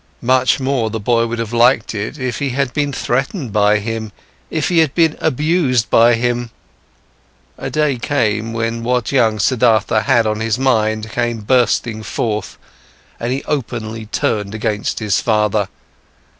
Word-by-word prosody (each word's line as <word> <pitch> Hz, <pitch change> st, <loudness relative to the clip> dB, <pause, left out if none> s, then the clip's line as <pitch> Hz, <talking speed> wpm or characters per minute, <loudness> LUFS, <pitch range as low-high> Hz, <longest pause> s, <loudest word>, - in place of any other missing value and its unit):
Much 130 Hz, +2 st, +3 dB
more 130 Hz, -4 st, 0 dB
the 110 Hz, +1 st, -4 dB
boy 115 Hz, +2 st, +1 dB
would 120 Hz, +1 st, -4 dB
have 115 Hz, 0 st, -4 dB
liked 120 Hz, +2 st, +3 dB
it 110 Hz, +7 st, -4 dB
if 125 Hz, -4 st, -3 dB
he 140 Hz, -, -1 dB
had 135 Hz, -1 st, -1 dB
been 145 Hz, +1 st, 0 dB
threatened 135 Hz, -, -2 dB
by 105 Hz, 0 st, +4 dB
him, 110 Hz, 0 st, -4 dB, 0.4 s
if 155 Hz, -2 st, -1 dB
he 175 Hz, -2 st, +3 dB
had 155 Hz, -4 st, +2 dB
been 165 Hz, -3 st, +3 dB
abused 145 Hz, -5 st, +1 dB
by 115 Hz, +1 st, +5 dB
him. 120 Hz, 0 st, -1 dB, 1.1 s
A -, -, -5 dB
day 150 Hz, -4 st, 0 dB
came 115 Hz, -5 st, 0 dB
when 115 Hz, 0 st, -2 dB
what 125 Hz, -1 st, 0 dB
young 115 Hz, -5 st, +2 dB
Siddhartha 110 Hz, -1 st, +2 dB
had 120 Hz, -2 st, +3 dB
on 110 Hz, 0 st, -1 dB
his 110 Hz, 0 st, 0 dB
mind 110 Hz, -4 st, 0 dB
came 120 Hz, -2 st, -2 dB
bursting 120 Hz, -1 st, +1 dB
forth, 105 Hz, -3 st, -3 dB, 0.6 s
and 120 Hz, +1 st, -2 dB
he 135 Hz, +2 st, -2 dB
openly 115 Hz, -5 st, -4 dB
turned 105 Hz, -1 st, -1 dB
against 110 Hz, -1 st, -2 dB
his 100 Hz, -4 st, 0 dB
father. 105 Hz, -2 st, +1 dB
115 Hz, 155 wpm, -17 LUFS, 110-130 Hz, 1.1 s, by